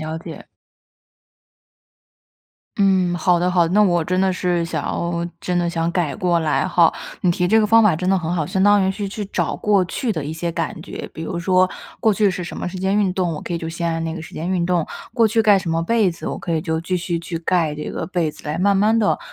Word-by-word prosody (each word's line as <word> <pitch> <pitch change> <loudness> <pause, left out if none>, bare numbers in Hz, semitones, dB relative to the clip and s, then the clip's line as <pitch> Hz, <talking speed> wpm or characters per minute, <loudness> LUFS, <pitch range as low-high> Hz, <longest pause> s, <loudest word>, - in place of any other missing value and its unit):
了 155 +1 -4
解。 - - -10 2.3
嗯， 190 -3 +2
好 175 +1 +2
的 180 +1 +1
好 175 -2 +3
的， 180 - -2
那 210 - +6
我 175 -4 +3
真 180 +3 -1
的 190 0 +2
是 175 -2 0
想 165 - -3
要 170 0 -2 0.2
真 180 -1 0
的 175 -1 0
想 165 0 -1
改 170 -5 -1
过 175 -4 +1
来 155 -2 +1
吼， 175 -2 +4 0.3
你 180 - +2
提 180 +1 0
这 220 +5 +4
个 215 - +2
方 225 +2 +6
法 210 -6 +4
真 180 +4 -2
的 190 0 +3
很 170 0 -2
好， 160 -4 -1
相 190 +4 0
当 205 0 +5
于 190 - +2
是 200 +1 -4
去 210 +2 -5
找 - - -1
过 205 -3 +2
去 230 +7 -3
的 160 -9 -2
一 150 - -4
些 170 +2 -3
感 165 -2 -4
觉。 - - -7
比 160 - -7
如 170 +2 -4
说， 185 +1 +3 0.3
过 220 -2 +3
去 205 -1 +3
是 180 -1 -4
什 175 - -7
么 - - -4
时 180 +1 -5
间 190 +2 0
运 195 -3 +2
动， 180 -3 -1
我 150 - -7
可 - - -5
以 170 - -1
就 165 0 -5
先 170 0 -2
按 165 0 -2
那 160 0 -3
个 165 - -6
时 - - -12
间 165 +3 -4
运 180 -2 +1
动， 175 -2 0 0.3
过 230 -2 +3
去 225 +1 +2
盖 205 -2 +5
什 180 -3 -4
么 165 0 0
被 215 +1 +2
子， 165 - -8
我 - - -3
可 170 - -3
以 160 - -1
就 160 -2 -1
继 180 +2 -2
续 175 -1 -2
去 165 0 -5
盖 170 -3 +1
这 150 - -5
个 160 - -4
被 175 -3 -1
子， - - -16
来 150 - -2
慢 200 +3 +2
慢 210 +3 +3
地 210 -2 +2
180 Hz, 285 characters per minute, -20 LUFS, 165-190 Hz, 2.3 s, 那